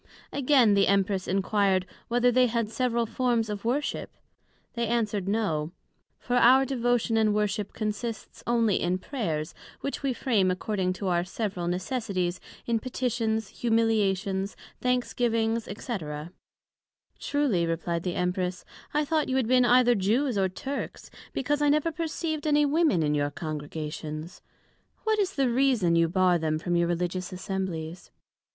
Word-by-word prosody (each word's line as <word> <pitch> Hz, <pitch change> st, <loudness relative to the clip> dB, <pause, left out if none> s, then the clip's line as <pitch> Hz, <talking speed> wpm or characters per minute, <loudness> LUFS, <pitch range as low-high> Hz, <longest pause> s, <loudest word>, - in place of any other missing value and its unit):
Again, 260 Hz, -6 st, +4 dB
the 200 Hz, 0 st, +4 dB
Empress 195 Hz, -1 st, +1 dB
enquired, 195 Hz, -1 st, +2 dB, 0.2 s
Whether 245 Hz, +1 st, +3 dB
they 250 Hz, +1 st, +4 dB
had 230 Hz, -2 st, -1 dB
several 235 Hz, -1 st, 0 dB
Forms 235 Hz, -1 st, 0 dB
of 205 Hz, -1 st, -5 dB
Worship? 265 Hz, +6 st, -1 dB, 0.6 s
They 235 Hz, -1 st, -1 dB
answered, 215 Hz, -4 st, 0 dB
No: 175 Hz, -7 st, -1 dB, 0.4 s
For 245 Hz, 0 st, -1 dB
our 260 Hz, +3 st, +6 dB
Devotion 245 Hz, -3 st, +1 dB
and 215 Hz, -1 st, +3 dB
Worship 210 Hz, -1 st, -1 dB
consists 215 Hz, +1 st, -4 dB
onely 230 Hz, -4 st, +3 dB
in 180 Hz, +1 st, +1 dB
Prayers, 180 Hz, -, -3 dB, 0.3 s
which 280 Hz, -, -3 dB
we 275 Hz, -2 st, 0 dB
frame 225 Hz, -7 st, +1 dB
according 185 Hz, 0 st, -1 dB
to 195 Hz, +1 st, -4 dB
our 175 Hz, -1 st, +2 dB
several 185 Hz, -2 st, -3 dB
Necessities, 185 Hz, -1 st, -2 dB, 0.3 s
in 230 Hz, -1 st, +1 dB
Petitions, 225 Hz, -3 st, -1 dB
Humiliations, 205 Hz, -4 st, 0 dB, 0.3 s
Thanksgiving, 235 Hz, -2 st, +1 dB
&c. 210 Hz, -3 st, -8 dB, 1.4 s
Truly, 250 Hz, -13 st, +1 dB
replied 170 Hz, 0 st, -2 dB
the 180 Hz, 0 st, -3 dB
Empress, 180 Hz, 0 st, -1 dB, 0.3 s
I 300 Hz, 0 st, +2 dB
thought 310 Hz, -1 st, 0 dB
you 260 Hz, -, 0 dB
had 260 Hz, -4 st, +1 dB
been 250 Hz, 0 st, +4 dB
either 245 Hz, 0 st, +5 dB
Jews, 230 Hz, +6 st, +1 dB
or 190 Hz, -1 st, +2 dB
Turks, 270 Hz, +9 st, -6 dB, 0.2 s
because 290 Hz, +3 st, -1 dB
I 295 Hz, -, +4 dB
never 305 Hz, +3 st, +2 dB
perceived 315 Hz, -1 st, -3 dB
any 295 Hz, 0 st, +4 dB
Women 290 Hz, -, +2 dB
in 150 Hz, 0 st, +1 dB
your 145 Hz, -1 st, +1 dB
Congregations: 155 Hz, +1 st, -6 dB, 0.5 s
But -, -, -37 dB
what 435 Hz, -1 st, +2 dB
is 395 Hz, -1 st, 0 dB
the 270 Hz, -4 st, +2 dB
reason, 240 Hz, -9 st, +3 dB
you 165 Hz, 0 st, +3 dB
bar 180 Hz, -1 st, +3 dB
them 155 Hz, -1 st, 0 dB
from 175 Hz, +2 st, -1 dB
your 170 Hz, 0 st, +2 dB
religious 180 Hz, +2 st, -2 dB
Assemblies? 185 Hz, -3 st, -4 dB
215 Hz, 145 wpm, -27 LUFS, 185-250 Hz, 1.4 s, our